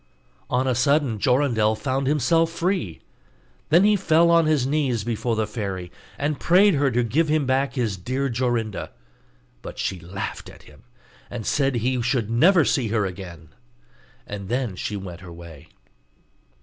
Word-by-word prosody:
On 125 +1 +1
a 130 - +1
sudden 130 -2 +1
Jorindel 120 -4 +2
found 130 +3 -2
himself 155 +4 +2
free. 170 - -2 0.7
Then 170 +5 +5
he 210 0 +5
fell 170 -3 +3
on 165 -1 +4
his 150 -5 +2
knees 135 -6 0
before 115 0 -2
the 110 0 0
fairy, 100 -5 -5 0.3
and 145 0 -2
prayed 195 +3 +5
her 140 -2 +2
to 125 0 +1
give 155 +8 +1
him 155 -2 +2
back 130 +1 0
his 115 -7 -1
dear 130 +9 -2
Jorinda: 120 -4 -2 0.7
but - - -9
she 95 - -2
laughed 90 +3 -6
at - - -15
him, - - -18 0.5
and 115 -3 -6
said 135 -2 +1
he 125 +2 0
should 115 -2 -1
never 165 +8 +5
see 130 -5 +1
her 105 -1 0
again; 90 -4 -8 0.8
then 105 +2 -3
she 105 +3 -4
went 90 -2 -8
her 90 -2 -10
way. 85 -3 -12
125 Hz, 160 wpm, -23 LUFS, 105-145 Hz, 0.8 s, Then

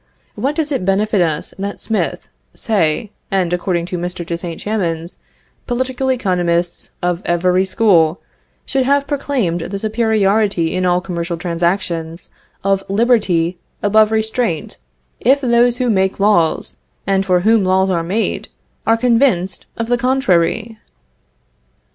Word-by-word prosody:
What 270 +8 -2
does 310 -2 -1
it 270 - -1
benefit 195 +1 +1
us 160 -3 -1
that 200 +1 -4
Smith, 220 -2 -2 0.3
Say, 200 0 0 0.2
and, 185 -3 0
according 175 -1 -1
to 180 0 -4
Mr. 175 0 -4
de 170 - -3
St. 170 -1 -6
Chamans, 175 -5 -3 0.5
political 260 +1 -1
economists 175 -7 -1
of 175 0 0
every 180 +2 +2
school, 185 -5 +3 0.5
should 270 - 0
have 280 +1 +2
proclaimed 270 - -1
the 195 +4 -4
superiority 215 -5 +1
in 185 0 +1
all 180 0 +2
commercial 170 -1 -4
transactions, 170 -1 -2 0.3
of 195 0 +1
liberty 195 -6 +2 0.2
above 215 +1 +4
restraint, 220 -5 -1 0.4
if 270 +4 +3
those 240 -1 +3
who 250 -1 0
make 190 -1 +1
laws, 195 -6 +2 0.3
and 195 0 +1
for 180 -2 +2
whom 220 +1 +4
laws 190 +1 +2
are 170 -2 +1
made, 195 +7 -2 0.4
are 225 +1 +4
convinced 230 -6 +1
of 230 - -1
the 245 0 +1
contrary? 225 -3 +1
195 Hz, 135 wpm, -17 LUFS, 175-225 Hz, 0.5 s, above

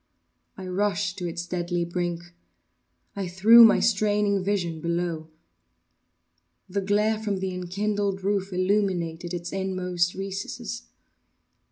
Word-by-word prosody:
I 190 - -7
rushed 195 0 -1
to 175 - -3
its 170 0 -5
deadly 175 -1 -2
brink. 175 0 -4 0.8
I 195 -2 -3
threw 215 +7 +8
my 225 - +7
straining 205 -2 +2
vision 175 -5 -1
below. 170 -1 -2 1.4
The 200 +1 -2
glare 210 +2 +1
from 205 -3 -2
the 190 0 -3
enkindled 195 +2 -2
roof 200 0 -1
illumined 185 -3 0
its 175 0 -5
inmost 185 -2 -1
recesses. 195 +5 -5
190 Hz, 115 wpm, -26 LUFS, 175-205 Hz, 1.4 s, threw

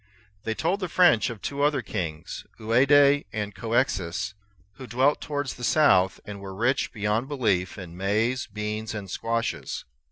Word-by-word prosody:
They 110 - -1
told 175 - 0
the 185 -3 -3
French 175 - +4
of 115 -3 -8
two 140 0 -3
other 145 -3 +2
kings, 80 -4 -5
Ouade 140 +5 +4
and 105 -2 -3
Couexis, 105 -3 -1 0.4
who 130 - -9
dwelt 130 +5 +2
towards 145 -3 -3
the 125 - -11
south, 105 -10 +4
and 100 -1 -8
were 95 -1 -7
rich 120 +6 +1
beyond 105 +3 -1
belief 105 -11 0
in 90 -4 -9
maize, 110 +7 0
beans, 105 +1 -4
and 100 -3 -6
squashes. 115 +2 -2
115 Hz, 155 wpm, -26 LUFS, 100-140 Hz, 0.4 s, French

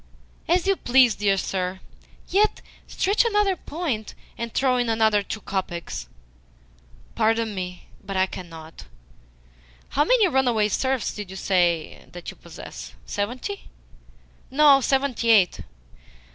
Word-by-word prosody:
"As 355 +1 +2
you 390 -1 +2
please, 250 -2 +4
dear 200 -1 +1
sir. 185 -1 -2 0.5
Yet 420 +3 +2 0.3
stretch 400 +5 +2
another 415 -4 +2
point, 300 -11 -4 0.2
and 235 0 -5
throw 255 0 +2
in 245 -1 0
another 220 -2 +3
two 215 +2 -6
kopecks." 175 - -4 1.1
"Pardon 225 -1 +1
me, 180 -2 -6 0.2
but 195 -1 -4
I 185 - +4
cannot. 165 -4 -10 1.0
How 290 - +2
many 445 +4 +4
runaway 245 -8 +2
serfs 260 +2 0
did 205 -3 -7
you 190 - -8
say 175 -5 0
that 175 0 -7
you - - -15
possess? - - -10
Seventy?" 250 - -4 0.8
"No; 280 0 +6
seventy 265 -3 0
eight." 200 -6 +5
225 Hz, 125 wpm, -24 LUFS, 190-275 Hz, 1.1 s, No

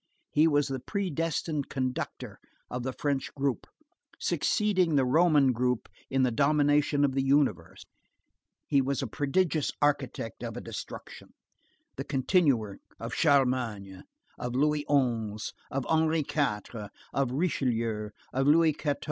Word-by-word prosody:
He 155 +2 +4
was 145 -2 +2
the 135 -1 -3
predestined 165 - -2
constructor 130 -2 -4 0.3
of 125 - -3
the 130 +2 -2
French 140 +1 -2
group, 140 -3 -1 0.5
succeeding 190 -7 +1
the 135 -2 +4
Roman 150 -1 +4
group 125 0 0 0.2
in 135 0 +2
the 125 - +2
domination 145 +2 +3
of 140 - +1
the 135 - +1
universe. 135 - +1 0.8
He 140 -2 +3
was 135 0 -1
a - - -1
prodigious 155 - 0
architect, 135 -6 -1
of - - -5
a - - -3
destruction, - - -9 0.6
the - - -3
continuer 130 - +1 0.2
of 115 +1 -5
Charlemagne, 125 - +1 0.4
of 125 0 -4
Louis 150 +2 +1
XI., 115 -7 0 0.2
of 135 -2 -2
Henry 160 0 +2
IV., 115 -7 -2 0.2
of 135 -3 0
Richelieu, 115 -8 -1 0.2
of 135 +2 +1
Louis 160 +1 +5
XIV. 145 -1 -1
135 Hz, 130 wpm, -29 LUFS, 125-150 Hz, 0.8 s, Louis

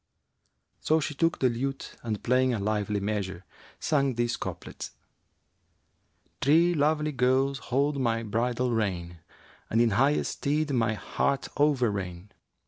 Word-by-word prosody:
'[FN#366] - - -12
So 160 +1 +4
she 150 - -3
took 165 +4 +1
the 130 - +3
lute 135 +3 -4
and 110 -3 -4
playing 125 0 +3
a - - -2
lively 105 0 -1
measure, 100 -3 -3 0.3
sang 140 -4 +1
these 120 0 0
couplets, - - -7 1.5
'Three 165 +5 +4
lovely 150 0 +1
girls 135 +1 +2
hold 140 +2 +1
my 115 -2 +1
bridle 120 +3 0
rein 90 -6 -2 0.3
* - - -27
And 115 - +2
in 115 -1 +4
highest 135 +8 +1
stead 150 0 0
my 115 -3 +1
heart 135 +7 -1
overreign. 105 -10 0
125 Hz, 135 wpm, -28 LUFS, 105-140 Hz, 1.5 s, So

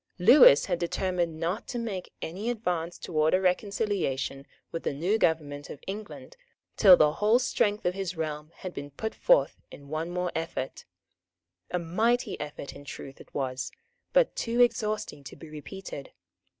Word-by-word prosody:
Lewis 185 - +8
had 170 - -1
determined 175 -2 -1
not 175 +7 -2
to 245 - -4
make 215 -6 -4
any 195 +8 -3
advance 180 -8 -2
towards 155 -1 +1
a - - +3
reconciliation 180 -8 -1 0.2
with 165 - -4
the - - -2
new 180 +10 +1
government 145 -5 0
of 145 - -8
England 210 - -7 0.4
till 190 -4 +8
the 150 -1 +5
whole 210 +8 +3
strength 210 -4 0
of 180 - +2
his 185 -2 -4
realm 155 -1 -4
had 185 -1 -7
been 145 0 -6
put 220 +11 -4
forth - - +3
in 140 0 -13
one 155 +2 -2
more 180 0 -2
effort. 160 -5 -4 0.8
A - - 0
mighty 220 +9 0
effort 145 -1 -6
in - - -11
truth 135 0 -9
it - - -16
was, 130 -2 -2 0.4
but - - +3
too 235 +1 -1
exhausting 215 - +1
to 135 - -10
be 160 - -12
repeated. 155 -1 -8
175 Hz, 165 wpm, -28 LUFS, 150-210 Hz, 0.8 s, Lewis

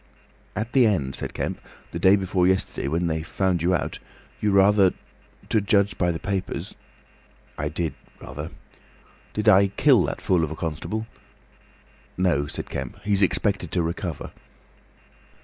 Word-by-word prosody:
"At 110 +3 -3
the 130 -4 +6
end," 70 -11 0
said - - -6
Kemp, - - -3 0.3
"the - - -4
day 95 +1 +6
before 95 -2 +1
yesterday, 95 -6 0
when 85 +5 0
they 80 -1 -1
found 90 +1 0
you 90 +2 +3
out, 85 - -3 0.4
you 105 - +2
rather—to 100 +2 +2
judge 100 0 +2
by 90 -1 +2
the 80 - -3
papers—" 95 +1 -3 0.8
"I - - -2
did. 85 -3 -2 0.3
Rather. 75 +4 -7 0.8
Did 105 +1 -2
I 100 -1 +7
kill 110 +2 +4
that - - -4
fool 90 -3 +2
of 80 - -1
a 80 - -5
constable?" 85 +8 -3 1.1
"No," 85 -6 +2
said - - -5
Kemp. 65 +2 -5
"He's 100 -1 +2
expected 95 -1 +1
to 90 - +2
recover." 85 -2 -4
95 Hz, 150 wpm, -24 LUFS, 80-100 Hz, 1.1 s, I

